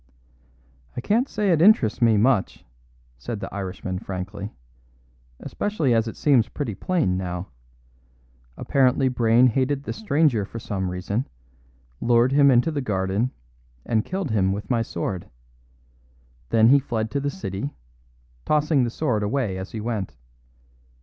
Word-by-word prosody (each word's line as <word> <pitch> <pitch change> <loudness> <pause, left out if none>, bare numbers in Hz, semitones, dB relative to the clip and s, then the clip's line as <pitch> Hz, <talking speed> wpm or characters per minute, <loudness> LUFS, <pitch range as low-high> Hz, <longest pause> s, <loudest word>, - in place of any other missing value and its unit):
"I - - 0
can't 235 - +1
say 205 -2 0
it 160 -2 +3
interests 150 - +4
me 115 -2 +4
much," 115 -1 +1 0.5
said 115 - -5
the - - -7
Irishman 95 -1 -4
frankly, 100 +3 -6 0.9
"especially 165 - -1
as 115 0 +2
it 115 - -7
seems 135 -6 +3
pretty 135 -8 -4
plain 105 - 0
now. 90 0 -4 1.1
Apparently 130 0 +2
Brayne 120 0 +4
hated 130 +3 +1
this - - -5
stranger 150 - +2
for 105 - -8
some 95 -4 -3
reason; 90 +7 -3 0.7
lured 120 +1 +3
him 140 0 +5
into 125 +5 +3
the 145 -2 -2
garden, 100 +1 -1 0.6
and 110 -2 +1
killed 185 - -3
him 95 -3 +2
with 100 +4 -5
my 120 -2 +2
sword. 90 -3 -4 1.2
Then 115 0 +5
he 140 +2 +6
fled 115 -5 -3
to 140 - -1
the 140 +1 -1
city, 125 - -5 0.7
tossing 150 -2 +2
the 120 - 0
sword 115 -4 -1
away 105 -1 -1
as 95 +1 -6
he 110 - -5
went. 110 - -3
115 Hz, 145 wpm, -24 LUFS, 100-140 Hz, 1.2 s, he